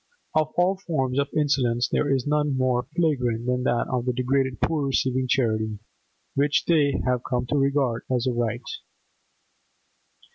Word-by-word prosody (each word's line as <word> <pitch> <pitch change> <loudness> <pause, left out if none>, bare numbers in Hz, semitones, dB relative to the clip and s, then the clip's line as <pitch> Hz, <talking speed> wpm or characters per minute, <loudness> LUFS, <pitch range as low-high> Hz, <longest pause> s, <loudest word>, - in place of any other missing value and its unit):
Of 155 -1 +2
all 180 +2 +3
forms 135 -8 -1
of 140 - +1
insolence 130 -5 +1
there 145 - 0
is 135 -2 +1
none 150 -2 +1
more 125 -2 +1
flagrant 125 -9 0
than 125 0 0
that 120 -2 +1
of 125 -1 -2
the 125 - +1
degraded 130 -1 0
poor 150 -4 0
receiving 130 -1 0
charity 110 -4 0 0.6
which 145 +1 +1
they 150 -4 +2
have 125 -1 +1
come 125 -1 -1
to - - 0
regard 135 -4 +1
as 125 -2 0
a 130 - +1
right. 120 0 -2
130 Hz, 155 wpm, -25 LUFS, 125-145 Hz, 0.6 s, all